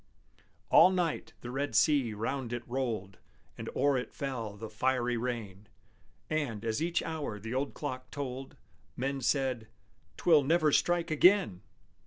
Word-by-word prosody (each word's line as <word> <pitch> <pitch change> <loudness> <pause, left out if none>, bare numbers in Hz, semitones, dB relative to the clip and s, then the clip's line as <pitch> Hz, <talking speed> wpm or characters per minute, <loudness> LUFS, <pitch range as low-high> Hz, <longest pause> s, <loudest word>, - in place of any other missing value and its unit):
All 180 - +8
night 180 -4 -1
the 120 - -6
red 140 +3 -2
sea 135 -8 +3
round 120 +3 -3
it 120 0 -5
rolled, 115 -7 -3 0.4
And - - -6
o'er 140 0 +3
it 125 - -8
fell 115 -7 -4
the 110 +2 -6
fiery 125 +2 0
rain: 115 -4 -4 0.6
And, 125 -9 -2
as 110 +3 -1
each 170 +1 0
hour 150 -10 -4
the 110 +4 -6
old 135 +2 -2
clock 130 -3 -5
told, 135 -2 -6 0.4
Men 135 +2 -2
said, 130 -3 0 0.5
"'Twill 160 -4 +5
never 155 +2 +3
strike 175 +2 +2
again!" 165 - +4
130 Hz, 145 wpm, -31 LUFS, 115-145 Hz, 0.6 s, All